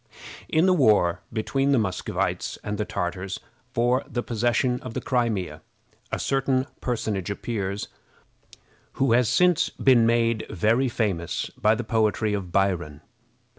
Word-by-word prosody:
In 160 Hz, +3 st, +3 dB
the 185 Hz, -, +5 dB
war 105 Hz, -, +3 dB
between 135 Hz, +5 st, 0 dB
the -, -, +4 dB
Muscovites 100 Hz, -5 st, -2 dB
and 105 Hz, 0 st, -4 dB
the 105 Hz, -, 0 dB
Tartars 95 Hz, 0 st, -3 dB, 0.3 s
for 125 Hz, +2 st, +1 dB
the 120 Hz, -, -2 dB
possession 120 Hz, +2 st, 0 dB
of 125 Hz, -2 st, -8 dB
the -, -, 0 dB
Crimea, 115 Hz, -8 st, -1 dB, 0.5 s
a -, -, -1 dB
certain 135 Hz, -1 st, +1 dB
personage 110 Hz, -6 st, -2 dB
appeared, 100 Hz, -1 st, -3 dB, 1.1 s
who 135 Hz, -2 st, +1 dB
has 120 Hz, -1 st, +4 dB
since 180 Hz, -2 st, +3 dB
been 120 Hz, -4 st, +4 dB
made 115 Hz, -1 st, +1 dB
very 115 Hz, +7 st, +2 dB
famous 95 Hz, -8 st, -2 dB
by 110 Hz, +1 st, +3 dB
the 120 Hz, -, -3 dB
poetry 110 Hz, -2 st, +1 dB
of 95 Hz, -4 st, -4 dB
Byron. 85 Hz, -6 st, 0 dB
115 Hz, 135 wpm, -25 LUFS, 100-125 Hz, 1.1 s, the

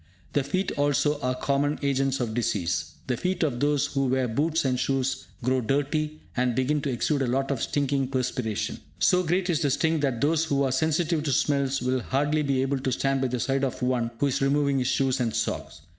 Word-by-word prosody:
The 145 Hz, -, +2 dB
feet 185 Hz, +8 st, -1 dB
also 145 Hz, +1 st, +2 dB
are 125 Hz, -1 st, 0 dB
common 140 Hz, +3 st, 0 dB
agents 135 Hz, -1 st, +1 dB
of 120 Hz, -3 st, -2 dB
disease. 105 Hz, -7 st, -1 dB
The 125 Hz, -, 0 dB
feet 180 Hz, +3 st, -1 dB
of 135 Hz, -6 st, 0 dB
those 145 Hz, 0 st, +2 dB
who 135 Hz, -1 st, -1 dB
wear 130 Hz, 0 st, +1 dB
boots 150 Hz, +7 st, 0 dB
and 130 Hz, -1 st, +1 dB
shoes 135 Hz, -1 st, -1 dB, 0.2 s
grow 130 Hz, +1 st, +2 dB
dirty, 150 Hz, +5 st, -1 dB
and 125 Hz, -1 st, +1 dB
begin 140 Hz, +4 st, +1 dB
to 145 Hz, -, -2 dB
exude 140 Hz, +3 st, 0 dB
a 135 Hz, -, +1 dB
lot 135 Hz, +3 st, 0 dB
of 130 Hz, -5 st, -2 dB
stinking 140 Hz, -2 st, 0 dB
perspiration. 125 Hz, -4 st, -2 dB, 0.2 s
So 180 Hz, -, +4 dB
great 180 Hz, +2 st, 0 dB
is 170 Hz, -3 st, +1 dB
the 145 Hz, -, +2 dB
stink 160 Hz, +3 st, +1 dB
that 135 Hz, -5 st, 0 dB
those 155 Hz, +4 st, +2 dB
who 140 Hz, -2 st, +1 dB
are 135 Hz, -, +1 dB
sensitive 160 Hz, +4 st, +1 dB
to 150 Hz, -2 st, -1 dB
smells 135 Hz, 0 st, +1 dB
will 130 Hz, +1 st, +1 dB
hardly 145 Hz, +5 st, 0 dB
be 135 Hz, -3 st, +1 dB
able 135 Hz, 0 st, 0 dB
to 130 Hz, 0 st, -1 dB
stand 135 Hz, +1 st, 0 dB
by 130 Hz, -, +1 dB
the 125 Hz, 0 st, -2 dB
side 135 Hz, +2 st, 0 dB
of 130 Hz, -1 st, -2 dB
one 125 Hz, -2 st, +1 dB
who 145 Hz, -, +1 dB
is 140 Hz, -1 st, 0 dB
removing 140 Hz, 0 st, +2 dB
his 125 Hz, -, 0 dB
shoes 135 Hz, 0 st, +1 dB
and 115 Hz, -3 st, -1 dB
socks. -, -, -3 dB
135 Hz, 220 wpm, -26 LUFS, 130-145 Hz, 0.2 s, So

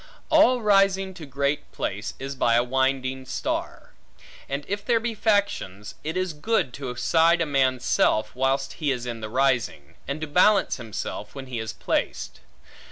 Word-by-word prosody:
All 255 Hz, -6 st, +5 dB
rising 195 Hz, -2 st, +3 dB
to 165 Hz, -5 st, -10 dB
great 140 Hz, +2 st, -1 dB
place -, -, -4 dB
is 135 Hz, +1 st, -5 dB
by 120 Hz, -3 st, +2 dB
a 120 Hz, -, +4 dB
winding 130 Hz, +1 st, 0 dB
star; -, -, -4 dB, 0.6 s
and 140 Hz, +1 st, -3 dB
if 200 Hz, +1 st, -3 dB
there 230 Hz, +1 st, +2 dB
be 230 Hz, 0 st, -2 dB
factions, 200 Hz, -, 0 dB
it 160 Hz, +4 st, -3 dB
is 185 Hz, -2 st, -1 dB
good 150 Hz, -, 0 dB
to 130 Hz, -3 st, -5 dB
side 165 Hz, +6 st, +3 dB
a 165 Hz, -, +2 dB
man's 130 Hz, -4 st, +1 dB
self, 110 Hz, +1 st, +2 dB
whilst 135 Hz, +1 st, 0 dB
he 150 Hz, -, +1 dB
is 125 Hz, -2 st, -3 dB
in 120 Hz, -2 st, -5 dB
the 110 Hz, -, -5 dB
rising, 120 Hz, -, 0 dB
and 140 Hz, +3 st, -3 dB
to 155 Hz, -, -3 dB
balance 185 Hz, +6 st, +3 dB
himself 110 Hz, -2 st, -6 dB
when 135 Hz, -1 st, -6 dB
he 125 Hz, -3 st, -5 dB
is 110 Hz, -1 st, -4 dB
placed. -, -, -2 dB
140 Hz, 170 wpm, -25 LUFS, 125-185 Hz, 0.6 s, All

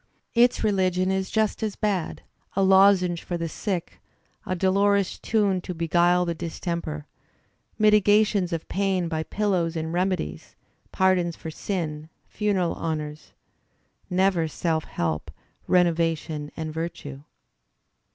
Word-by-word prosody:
Its 240 Hz, 0 st, +4 dB
religion 185 Hz, -3 st, +1 dB
is 190 Hz, 0 st, -1 dB
just 220 Hz, 0 st, 0 dB
as 215 Hz, -2 st, -2 dB
bad; 200 Hz, -5 st, -2 dB, 0.3 s
a 195 Hz, -, +2 dB
lozenge 190 Hz, -2 st, +5 dB
for 175 Hz, -, -3 dB
the 165 Hz, 0 st, -3 dB
sick; 180 Hz, +1 st, -4 dB, 0.5 s
a 185 Hz, -, 0 dB
dolorous 195 Hz, +1 st, +2 dB
tune 200 Hz, -4 st, +1 dB
to 180 Hz, -, -6 dB
beguile 175 Hz, +2 st, +3 dB
the 170 Hz, -, -1 dB
distemper; 165 Hz, -2 st, -4 dB, 0.7 s
mitigations 210 Hz, -2 st, +4 dB
of 165 Hz, -1 st, -3 dB
pain 190 Hz, -3 st, 0 dB
by 160 Hz, -1 st, -2 dB
pillows 180 Hz, -2 st, -1 dB
and 160 Hz, 0 st, -3 dB
remedies; 180 Hz, -, -2 dB, 0.4 s
pardons 185 Hz, -3 st, +2 dB
for 160 Hz, -, -7 dB
sin, 155 Hz, -4 st, -4 dB, 0.2 s
funeral 195 Hz, -5 st, 0 dB
honours 155 Hz, -2 st, -5 dB, 0.4 s
— -, -, -42 dB, 0.2 s
never 175 Hz, -4 st, +2 dB
self 160 Hz, 0 st, -1 dB
help, 80 Hz, -2 st, -3 dB, 0.4 s
renovation 165 Hz, -4 st, +1 dB
and 160 Hz, -1 st, -4 dB
virtue. 155 Hz, -4 st, -5 dB
180 Hz, 120 wpm, -25 LUFS, 165-195 Hz, 0.7 s, lozenge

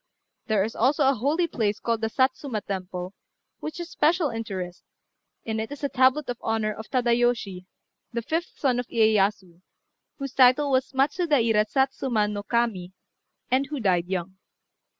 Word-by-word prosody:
There 215 Hz, -4 st, +2 dB
is 225 Hz, +3 st, -4 dB
also 280 Hz, +2 st, +2 dB
a 270 Hz, -, +5 dB
holy 290 Hz, +9 st, +1 dB
place 215 Hz, -10 st, -1 dB
called 230 Hz, -1 st, -1 dB
the 225 Hz, -, 0 dB
Satsuma 260 Hz, -2 st, 0 dB
Temple, 185 Hz, -1 st, -5 dB, 0.5 s
which 310 Hz, -, -6 dB
has 345 Hz, 0 st, -6 dB
a -, -, -17 dB
special 325 Hz, 0 st, +2 dB
interest; 190 Hz, -6 st, -5 dB, 0.6 s
in 220 Hz, -1 st, -2 dB
it 220 Hz, +3 st, -4 dB
is 290 Hz, 0 st, -8 dB
a 280 Hz, -, +1 dB
tablet 260 Hz, +3 st, +3 dB
in 245 Hz, -, -3 dB
honour 220 Hz, -1 st, -1 dB
of 220 Hz, +1 st, -10 dB
Tadayoshi, 235 Hz, -7 st, 0 dB, 0.4 s
the 235 Hz, -1 st, -3 dB
fifth 330 Hz, +7 st, -2 dB
son 255 Hz, -4 st, +1 dB
of 245 Hz, -, -4 dB
Iyéyasu, 205 Hz, -5 st, +1 dB, 0.6 s
whose 275 Hz, -2 st, -5 dB
title 270 Hz, +2 st, +5 dB
was 260 Hz, 0 st, +1 dB
Matsudaira 265 Hz, -, +2 dB
Satsuma 265 Hz, -5 st, +1 dB
no 205 Hz, -1 st, -3 dB
Kami, 205 Hz, -5 st, -1 dB, 0.6 s
and 265 Hz, +2 st, +2 dB
who 290 Hz, 0 st, -4 dB
died 180 Hz, -6 st, +1 dB
young. 190 Hz, 0 st, -4 dB
235 Hz, 160 wpm, -25 LUFS, 210-270 Hz, 0.6 s, a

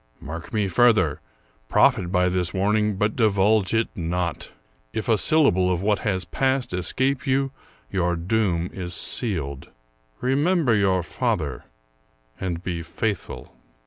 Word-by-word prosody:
Mark 80 Hz, +3 st, -8 dB
me 105 Hz, -2 st, 0 dB
further: 95 Hz, -9 st, +3 dB, 0.5 s
profit 90 Hz, -1 st, +3 dB
by 90 Hz, -1 st, +2 dB
this 90 Hz, -1 st, -1 dB
warning, 105 Hz, +2 st, +1 dB
but 105 Hz, +2 st, 0 dB
divulge 105 Hz, -3 st, +2 dB
it 110 Hz, 0 st, +2 dB
not. 85 Hz, -2 st, -3 dB, 0.4 s
If 110 Hz, -, -3 dB
a 115 Hz, -, +4 dB
syllable 100 Hz, -, +4 dB
of 90 Hz, +1 st, -1 dB
what 105 Hz, -1 st, +2 dB
has 95 Hz, -4 st, -1 dB
passed 130 Hz, -5 st, -1 dB
escape 130 Hz, +11 st, -1 dB
you, 135 Hz, 0 st, +1 dB, 0.4 s
your 90 Hz, -2 st, 0 dB
doom 90 Hz, -1 st, 0 dB
is 90 Hz, -2 st, -4 dB
sealed. 75 Hz, -, -1 dB, 0.5 s
Remember 145 Hz, +1 st, +2 dB
your 95 Hz, -4 st, +2 dB
father, 85 Hz, -, -2 dB, 0.7 s
and 90 Hz, -2 st, -3 dB
be 85 Hz, -3 st, -3 dB
faithful." 100 Hz, +4 st, -4 dB
95 Hz, 130 wpm, -24 LUFS, 90-110 Hz, 0.7 s, a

